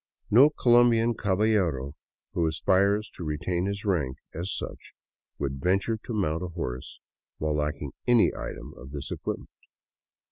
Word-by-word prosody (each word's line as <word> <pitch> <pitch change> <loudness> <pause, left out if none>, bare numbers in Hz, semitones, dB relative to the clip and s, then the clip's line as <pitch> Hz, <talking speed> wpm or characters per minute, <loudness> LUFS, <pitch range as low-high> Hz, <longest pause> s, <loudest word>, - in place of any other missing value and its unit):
No 130 +8 +8
Colombian 120 -4 +4
caballero 95 - +1 0.4
who 85 -2 +1
aspires 100 +6 +2
to - - -8
retain 85 +4 -1
his 100 +1 -3
rank 75 -9 0 0.2
as 85 +3 -3
such - - -6 0.4
would 70 -1 -3
venture 100 +5 +1
to 120 - -4
mount 85 -5 0
a 90 - -3
horse 65 -8 -5 0.4
while 75 0 -1
lacking 75 -2 -2 0.2
any 120 -2 +5
item - - -7
of 65 - -10
this 70 -1 -6
equipment. - - -4
90 Hz, 140 wpm, -27 LUFS, 75-105 Hz, 0.4 s, No